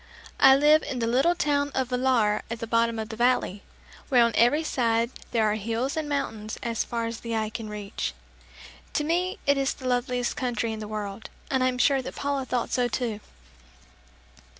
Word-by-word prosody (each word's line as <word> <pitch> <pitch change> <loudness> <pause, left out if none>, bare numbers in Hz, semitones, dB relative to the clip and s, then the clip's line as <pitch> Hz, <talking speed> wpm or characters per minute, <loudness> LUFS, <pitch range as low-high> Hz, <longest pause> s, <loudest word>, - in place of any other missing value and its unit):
I 270 0 +8
live 300 +2 +5
in 260 - -5
the 235 - 0
little 265 +9 +3
town 290 -4 +1
of 260 -2 0
Villar 250 -5 +2
at 230 - -3
the 230 - -3
bottom 230 0 +1
of 220 0 -4
the 220 - -6
valley, 240 -4 +1 0.5
where 250 -4 +6
on 235 - +2
every 270 +7 +4
side 235 -4 +1 0.2
there 225 -2 +2
are 210 - +2
hills 230 +5 -2
and 310 -2 -3
mountains 220 -6 -3
as 230 -2 -1
far 230 -1 -3
as 230 0 -4
the 230 -1 -4
eye 220 -1 -1
can 220 -1 -6
reach. 200 - -4 0.8
To 300 - +1
me 360 +6 0
it 280 0 +3
is 270 0 0
the 260 - -7
loveliest 245 0 0
country 245 -3 -1
in 220 - -6
the 215 - -6
world 210 0 -5 0.2
and 260 -1 +2
I - - +4
am 250 -1 -1
sure 270 +1 +3
that - - -7
Paula 280 -2 -2
thought 250 -2 -2
so 245 -1 +2
too. 230 -3 -2
245 Hz, 200 wpm, -26 LUFS, 225-270 Hz, 0.8 s, I